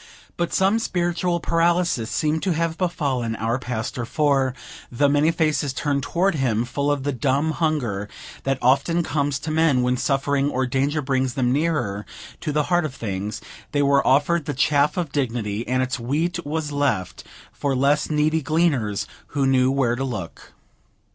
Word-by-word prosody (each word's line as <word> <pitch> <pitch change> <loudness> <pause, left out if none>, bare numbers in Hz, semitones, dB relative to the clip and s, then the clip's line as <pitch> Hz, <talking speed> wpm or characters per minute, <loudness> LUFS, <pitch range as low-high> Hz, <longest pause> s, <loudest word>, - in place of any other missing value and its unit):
But 175 0 -1
some 195 +4 +3
spiritual 175 -3 0
paralysis 170 -7 +1
seemed 155 0 0
to 185 -2 +1
have 165 0 -1
befallen 140 -10 -1
our 115 +3 -1
pastor; 120 -1 -4
for, 135 0 +1 0.4
though 145 +4 +2
many 145 +2 +3
faces 155 -4 0
turned 140 0 -1
toward 180 +8 +1
him, 120 -6 0
full 140 +3 -1
of 145 -2 -1
the 145 - 0
dumb 140 +4 0
hunger 130 -12 -1 0.3
that 135 -1 0
often 140 +7 +3
comes 145 -3 0
to 150 +2 -5
men 155 -5 +3
when 125 0 +1
suffering 140 +1 +1
or 130 -2 0
danger 140 +4 0
brings 130 -2 0
then 125 -2 +1
nearer 140 -10 -1 0.3
to 155 - -3
the 150 +1 +1
heart 175 +2 +1
of 145 -4 -4
things, 100 -1 -4 0.3
they 145 -1 +2
were 140 0 +3
offered 145 +5 +3
the 145 -4 -3
chaff 145 +4 +2
of 170 -5 -2
divinity, 115 -6 -2
and 130 +1 +1
its 130 0 -3
wheat 160 +8 -1
was 150 0 -3
left 140 - -1 0.3
for 140 -2 -2
less 140 +3 +2
needy 155 +1 +1
gleaners, 135 - +1 0.3
who 140 - +3
knew 130 -1 +3
where 135 -3 +1
to 130 - -3
look. 105 -10 -6
140 Hz, 170 wpm, -23 LUFS, 125-160 Hz, 0.4 s, some